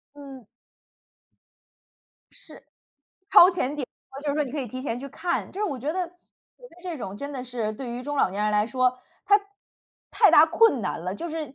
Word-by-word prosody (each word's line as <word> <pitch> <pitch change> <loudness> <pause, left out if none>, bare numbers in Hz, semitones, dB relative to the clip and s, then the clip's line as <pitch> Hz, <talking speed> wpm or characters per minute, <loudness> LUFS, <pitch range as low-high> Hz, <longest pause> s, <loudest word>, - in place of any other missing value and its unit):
嗯。 275 -5 -11 1.9
是， - - -13 0.7
超 355 - +9
前 295 -7 -2
点 275 -4 -4 0.2
播 270 - -9
就 295 - -3
是 285 - 0
说 300 0 +1
你 260 - -7
可 295 - -2
以 260 - -4
提 255 +3 -7
前 245 -4 -3
去 275 +2 -7
看， 345 +5 -3
就 390 - -6
是 - - +1
我 285 -10 -3
觉 285 +5 -2
得， 365 -1 -2
觉 355 - -27 0.5
得 335 - -21
这 350 -4 -5
种 195 -4 -6
真 280 +5 -6
的 255 -2 -5
是 235 -4 -3
对 245 +3 -7
于 240 +1 -5
中 290 +2 -4
老 230 - +2
年 200 +2 -3
人 210 - +1
来 210 0 +2
说， 255 0 +1 0.3
它 410 0 +5 0.7
太 - - +5
大 310 - +8
困 340 - +3
难 190 - -3
了， 180 +3 -4
就 340 +11 -5
是 310 -4 -6
275 Hz, 230 characters per minute, -25 LUFS, 245-320 Hz, 1.9 s, 超